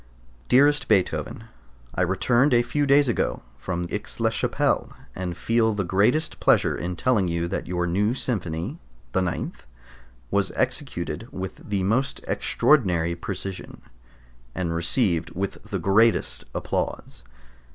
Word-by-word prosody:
Dearest 145 +3 +4
Beethoven, 100 -4 0 0.5
I 90 - -1
returned 120 - +3
a 120 - +4
few 145 +4 -1
days 140 0 +5
ago 120 - -1 0.2
from 90 +4 -3
Aix - - -4
la - - +2
Chapelle, - - 0 0.2
and 90 -1 -4
feel 115 -1 +1
the 100 - 0
greatest 110 - +1
pleasure - - +3
in 90 +1 -4
telling 105 -3 +2
you 85 0 -1
that 95 - -3
your 90 0 -1
new 100 +7 +1
Symphony 100 - -2 0.3
[the 95 - +1
9th] 90 -7 -4 0.6
was - - +1
executed - - -2
with 95 -1 -6
the 100 -2 0
most 120 +8 0
extraordinary 90 - +2
precision, 95 +2 -6 0.7
and 85 -3 -2
received 85 0 +1
with 95 +2 -3
the - - -3
greatest 110 +1 +2
applause. - - -3
95 Hz, 130 wpm, -24 LUFS, 90-120 Hz, 0.7 s, days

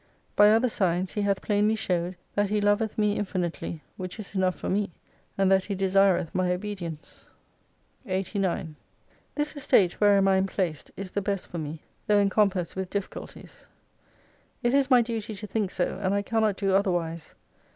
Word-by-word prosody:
By 205 0 +7
other 225 +4 +4
signs, 185 -4 0
He 210 - -1
hath 200 -1 0
plainly 210 +1 +2
showed, 180 -3 -1 0.2
that 205 -1 +1
He 210 0 +1
loveth 205 +1 +1
me 210 -1 +2
infinitely, 175 -5 -3
which 185 +2 -6
is 205 - -7
enough 185 -2 +1
for - - -6
me, 205 +1 0 0.5
and 195 -1 +3
that 190 -1 +4
He 200 - -3
desireth 190 -2 +2
my 185 -1 +1
obedience. 180 -5 -6 0.8
jo8 - - -8
89 185 -4 -1 0.6
This 295 +1 -2
estate 205 -11 +2
wherein 200 -1 +5
I 190 0 +4
am 190 +1 +1
placed 175 -6 -3
is 190 -2 -5
the 205 - -1
best 200 -1 -2
for 170 - -6
me: 155 0 -6 0.2
tho' 210 - +4
encompassed 195 -3 +2
with 190 -1 -3
difficulties. 200 0 -7 1.0
It 240 +1 +2
is 275 -1 +3
my 250 -3 +6
duty 225 -2 -4
to 205 +2 -7
think 210 -2 -1
so, 180 +1 -2
and 195 0 +1
I 200 - 0
cannot 220 -1 +1
do 195 -1 0
otherwise. 175 -5 0
195 Hz, 175 wpm, -27 LUFS, 185-210 Hz, 1.0 s, By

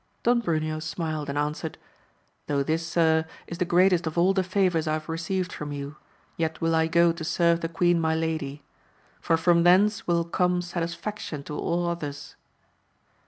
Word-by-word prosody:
Don 240 0 +3
Bruneo 155 -5 -1
smiled 155 -2 -3
and 140 - -3
answered. 150 +2 -2 0.7
Though 140 -1 +1
this, 160 +3 -1
sir, 160 -1 +2 0.2
is 170 - -8
the 180 - +1
greatest 180 0 +3
of 160 - -4
all 180 +3 +4
the 190 - +2
favours 180 -4 +1
I 155 - +1
have 155 0 -3
received 180 +3 -2
from 150 -1 -6
you, 140 +1 -6 0.4
yet 160 -1 -2
will 165 0 +1
I 160 0 +3
go 170 +1 +4
to 165 0 -6
serve 170 +1 +2
the 165 - -2
queen 175 0 +2
my 160 0 +1
lady; 155 -3 -3 0.6
for 165 - +1
from 170 +1 +3
thence 195 +5 +4
will 170 -1 +2
come 180 +1 0
satisfaction 170 -2 -4
to 150 - -7
all 175 +3 -1
others. 150 -4 -5
165 Hz, 175 wpm, -26 LUFS, 155-175 Hz, 0.7 s, all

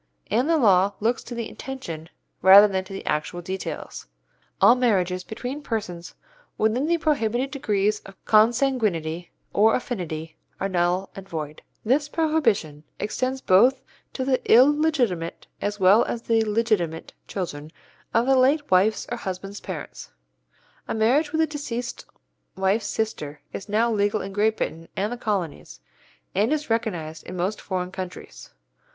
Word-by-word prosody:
and 245 +8 +2
the 330 - +4
law 200 -6 +4
looks 235 +4 0
to 240 - -7
the 230 -1 -3
intention 170 -12 -7 0.3
rather 195 +3 +9
than 190 -2 -1
to 185 - -14
the 195 - -7
actual 150 +3 -2
details. 185 +2 -6 0.5
All - - +7
marriages 190 -8 +1
between 250 +8 -6
persons 190 -10 -5 0.4
within 230 +7 +1
the 340 +1 +2
prohibited 270 -5 0
degrees 210 -6 0
of 195 - -14
consanguinity 215 - +2 0.2
or 220 +2 +4
affinity 165 -10 -4 0.2
are 195 - 0
null 180 +1 0
and 195 0 -10
void. 155 -3 -5 0.2
This 285 +6 +2
prohibition 240 - 0 0.2
extends 255 +5 -2
both 255 +8 +4 0.3
to 260 - -3
the 260 -1 +1
illegitimate 255 - +3 0.2
as 205 0 -2
well 195 +4 +6
as 235 - -4
the 225 -1 +2
legitimate 210 -7 0
children 155 -5 -5 0.4
of 230 - +2
the 270 +1 +4
late 285 +2 +2
wife's 195 +4 +3
or 240 - -2
husband's 195 0 -6
parents. - - -7 0.8
A - - -2
marriage 265 +8 +2
with 320 - +1
a - - +4
deceased 260 -6 -5 0.5
wife's 195 +3 +1
sister 150 -10 -3
is 195 - -7
now 225 +3 +2
legal 205 0 +1
in 195 0 -7
Great 215 +2 +2
Britain 165 +1 -4
and 210 +4 -1
the - - -5
Colonies, 200 -9 -3 0.5
and 210 +7 +2
is 300 -5 -1
recognized 175 -9 -2
in 180 - -6
most 190 +4 -2
foreign 185 -2 -3
countries. 185 -2 -8
210 Hz, 150 wpm, -24 LUFS, 185-245 Hz, 0.8 s, rather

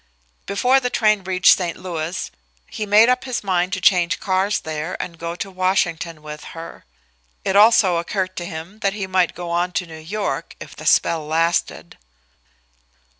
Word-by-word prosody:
Before 250 +7 +3
the 250 -1 -2
train 215 -4 +2
reached 185 0 +5
St. 175 -2 -3
Louis 170 -1 -4 0.4
he 215 - -4
made 210 +3 +6
up 250 +1 +1
his 255 -4 -3
mind 185 -2 0
to 185 - -1
change 175 -2 +3
cars 190 +2 0
there 155 +2 -5
and 170 -2 -6
go 170 0 -4
to 195 +2 -6
Washington 175 -4 -1
with 150 0 -8
her. 165 0 -9 0.6
It 195 - 0
also 205 -4 +6
occurred 185 +2 -2
to 175 - -4
him 170 +7 -8
that 195 -2 0
he 205 -2 -4
might 185 -2 +1
go 175 0 -6
on 175 +1 0
to 180 - -1
New 160 -1 -10
York 200 +7 -4
if - - -10
the - - -7
spell 160 -3 +2
lasted. 160 - -1
185 Hz, 175 wpm, -21 LUFS, 170-200 Hz, 0.6 s, made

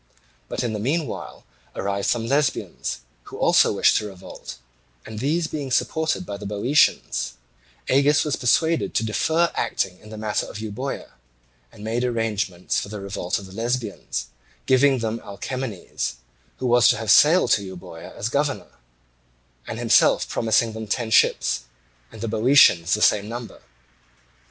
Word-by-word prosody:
But - - -3
in 120 -2 -2
the 105 - -3
meanwhile 140 +4 -3 0.3
arrived 100 0 -2
some 115 -2 0
Lesbians, 140 - -1 0.2
who - - -10
also - - +4
wished - - +4
to 105 - -2
revolt; 95 -9 -10 0.5
and 110 -1 -7
these 155 +7 0
being 150 -3 -4
supported 160 +6 0
by 100 - -6
the 105 - -9
Boeotians, 105 - +1 0.5
Agis 145 +3 +3
was 150 - 0
persuaded 160 +6 +1
to 115 - +1
defer 160 +10 +1
acting 90 -1 -2
in 110 - -15
the 110 - -8
matter 105 -1 -2
of - - -8
Euboea, 110 +6 -5 0.6
and 105 - -13
made 115 +3 -1
arrangements 110 -7 -1
for - - -6
the 105 0 -6
revolt 100 -2 -3
of 100 - -8
the 95 - -13
Lesbians, 115 - -3 0.4
giving 135 +1 +4
them 115 -1 -2
Alcamenes, 110 - -5 0.4
who - - -5
was 120 -1 +5
to - - +4
have 110 -1 0
sailed 165 - +6
to 100 - +3
Euboea, 90 -3 -10
as 105 - -3
governor, 140 +3 -2 0.9
and - - -5
himself - - +4
promising 115 0 +1
them 110 0 -6
ten 110 +2 -2
ships, 105 - +3 0.5
and 110 - -11
the 115 - -2
Boeotians 110 -6 +5
the 105 - 0
same 105 +1 +3
number. 120 0 -7
115 Hz, 155 wpm, -23 LUFS, 105-135 Hz, 0.9 s, sailed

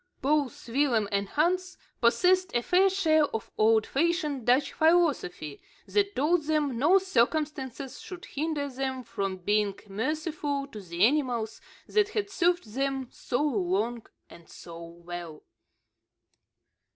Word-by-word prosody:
Both 285 -3 0
Willem 235 -4 +1
and 200 -1 -1
Hans 365 +4 0 0.2
possessed 360 +8 +3
a 240 - +2
fair 375 +6 +4
share 320 -5 +3
of 225 -6 -6
old 220 0 +4
fashioned 300 -4 -1
Dutch 255 +4 +3
philosophy, 300 - +1 0.2
that 405 -1 0
told 315 +3 +2
them 295 -5 0
no 330 +9 +5
circumstances 280 -5 -1
should 360 -2 -9
hinder 295 -1 -2
them 265 -1 -4
from 195 -5 -3
being 205 +2 0
merciful 290 - -2
to 215 -6 -9
the 175 +1 +1
animals 245 -5 0 0.2
that 420 -1 +2
had 410 -2 -3
served 350 - 0
them 270 -1 -2
so 245 +4 -2
long 220 -2 -1 0.2
and 170 - -16
so 170 0 -10
well. 170 -1 -9
270 Hz, 125 wpm, -28 LUFS, 220-315 Hz, 0.2 s, no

